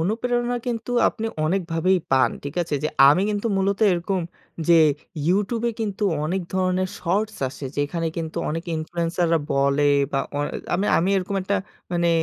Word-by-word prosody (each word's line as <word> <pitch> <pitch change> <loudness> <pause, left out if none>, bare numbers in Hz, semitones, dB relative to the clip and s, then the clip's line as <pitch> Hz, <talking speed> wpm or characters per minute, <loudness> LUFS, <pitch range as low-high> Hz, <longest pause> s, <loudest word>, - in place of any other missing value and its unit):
অনুপ্রেরণা 240 +6 0
কিন্তু 235 -1 -3 0.2
আপনি 225 -1 -4 0.2
অনেকভাবেই 180 +1 +1
পান। 135 -1 +4
ঠিক 140 +1 -5
আছে? 160 -3 -3 0.3
আমি 150 +7 +4
কিন্তু 205 +2 -2
মূলত 195 +1 +1
এরকম 180 +2 -1 0.5
যে 170 - +7 0.5
YouTube 210 +5 +1
এ - - 0
কিন্তু 210 -2 -3 0.2
অনেক 180 +5 -1
ধরণের 185 0 +1
শর্টস 205 +5 -1
আসে 135 +1 -7
যেখানে 165 +4 -1
কিন্তু 160 -1 -4
অনেকে 165 +3 -4
ইনফ্লুয়েন্সাররা 170 +1 0
বলে 140 +1 +2 0.3
বা 135 - +1 0.2
অ - - 0 0.4
আমি 195 +3 0
আমি 175 - +1
এরকম 190 +1 -2
একটা 200 +2 0 0.4
মানে 170 0 +2
180 Hz, 150 wpm, -23 LUFS, 165-200 Hz, 0.5 s, যে